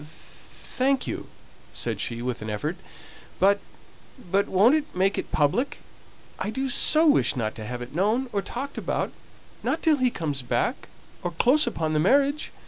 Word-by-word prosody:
"Thank 255 - -3
you!" - - -5 0.5
said - - -2
she, 120 0 -3
with 125 -2 -3
an 110 - -5
effort. 150 +11 -2 0.6
"But 200 +2 +4 0.7
but 200 +1 +2
won't 205 +8 +5
it 310 -1 -1
make 190 +2 +2
it - - -6
public? 180 - +1 0.6
I - - -2
do 265 +5 -2
so 310 +5 +4
wish 290 - +4
not 110 -4 -2
to 110 - -8
have 120 0 -4
it 120 - -11
known, 215 - +1
or 200 - +1
talked 270 +7 -5
about, - - -2 0.5
not 325 - -1
till 310 -2 +4
he 255 -2 +3
comes 150 - -3
back 125 - -1 0.3
or 175 - -2
close 250 - +3
upon 160 -9 -1
the 155 - +2
marriage." 280 - +2
200 Hz, 170 wpm, -25 LUFS, -, 0.7 s, won't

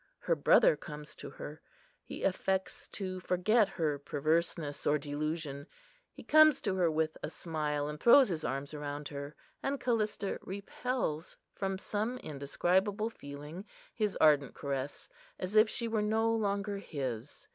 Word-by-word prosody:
Her - - 0
brother - - +5
comes 150 -2 -9
to - - -7
her: 150 +1 -9 0.4
he - - -7
affects 190 0 -1
to 185 -2 -5
forget 190 +4 +3
her 155 -6 -1
perverseness 155 +1 -1
or 150 - +4
delusion. 145 0 -3 0.4
He - - -12
comes 310 -1 +6
to 200 - +1
her 180 -3 +2
with 160 0 -1
a - - -3
smile, 150 -3 -2
and 150 0 -5
throws 255 - +7
his 160 -3 -2
arms 135 +2 -3
around 145 0 -5
her; 140 0 -6 0.3
and 275 0 -1
Callista 215 -5 0
repels, 200 -3 -3 0.2
from 195 -1 -2
some 215 +5 -2
indescribable 190 - 0
feeling, 145 +3 -8 0.3
his 210 -3 0
ardent 145 -3 +4
caress, 140 0 -4 0.3
as 185 +3 -4
if 215 +1 +7
she 235 - -2
were 220 -1 0
no 220 +2 +2
longer 200 -2 0
his. 130 - -5
175 Hz, 145 wpm, -32 LUFS, 150-210 Hz, 0.4 s, throws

